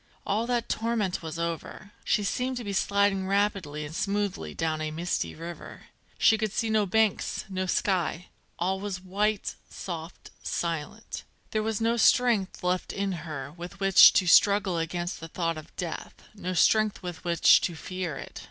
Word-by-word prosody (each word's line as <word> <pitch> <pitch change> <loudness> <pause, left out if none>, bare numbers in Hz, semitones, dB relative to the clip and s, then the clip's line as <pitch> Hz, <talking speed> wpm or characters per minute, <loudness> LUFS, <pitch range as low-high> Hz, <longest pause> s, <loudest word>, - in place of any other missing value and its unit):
All 220 +4 0
that 240 -1 0
torment 220 -5 -1
was 160 0 -6
over. 170 +4 -5
She 210 - +1
seemed 250 +6 -1
to 245 - -4
be 200 -2 -4
sliding 200 -1 +2
rapidly 195 -7 0
and 150 - -8
smoothly 195 - -2
down 160 -1 -1
a 155 - -2
misty 165 +3 -2
river. 170 +1 -9 0.3
She 220 - +4
could 215 -2 -1
see 225 +1 -1
no 215 -2 +2
banks, 220 +1 +1
no 185 -1 -2
sky; 180 -1 0 0.3
all 190 +2 0
was 195 -2 -4
white, 200 +3 -1 0.2
soft, 170 -2 -7
silent. 170 +6 -4 0.3
There 215 - 0
was 220 -1 -1
no 230 +1 +1
strength 230 -6 +3
left 180 0 0
in 200 0 -2 0.2
her 140 -2 -5
with 175 +2 -9
which 195 -1 +8
to 185 - +3
struggle 190 0 +5
against 175 +2 -3
the 165 - -7
thought 165 0 -2
of 155 +1 -11
death, 175 -3 -5 0.2
no 185 -3 -4
strength 215 +4 +3
with 175 -2 -6
which 170 -1 +5
to 175 - -2
fear 180 -3 -4
it. - - -8
185 Hz, 170 wpm, -27 LUFS, 170-210 Hz, 0.3 s, which